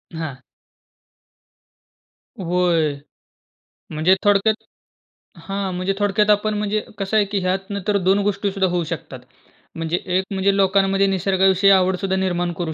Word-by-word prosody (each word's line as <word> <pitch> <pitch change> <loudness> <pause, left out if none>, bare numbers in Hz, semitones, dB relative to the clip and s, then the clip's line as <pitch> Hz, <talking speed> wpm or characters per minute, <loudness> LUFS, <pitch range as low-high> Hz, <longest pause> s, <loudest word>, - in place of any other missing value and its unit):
हां. 145 -5 -6 2.0
होय. 170 -4 +1 1.0
म्हणजे 160 +5 +3
थोडक्यात 205 +2 +2 0.8
हां, 195 -1 -3
म्हणजे 185 +2 -1
थोडक्यात 205 +1 +1
आपण 210 +1 +2
म्हणजे 210 +1 -1 0.2
कसं 200 +2 -1
आहे 210 - +3
की 200 0 -2
ह्यात 190 +2 -2
नंतर 200 -1 -5
तर - - +3
2 195 +2 +3
गोष्टी 200 0 -1
सुद्धा 195 -1 0
होऊ 175 -1 0
शकतात. - - -6 0.6
म्हणजे 165 +2 -2 0.2
एक 190 - +1
म्हणजे 195 0 +1
लोकांमध्ये 195 0 +2
निसर्गाविषयी 190 +1 +2
आवड 185 -1 +3
सुद्धा 190 0 -1
निर्माण 175 -2 -1
करू 165 -2 -2
190 Hz, 135 wpm, -21 LUFS, 180-200 Hz, 2.0 s, म्हणजे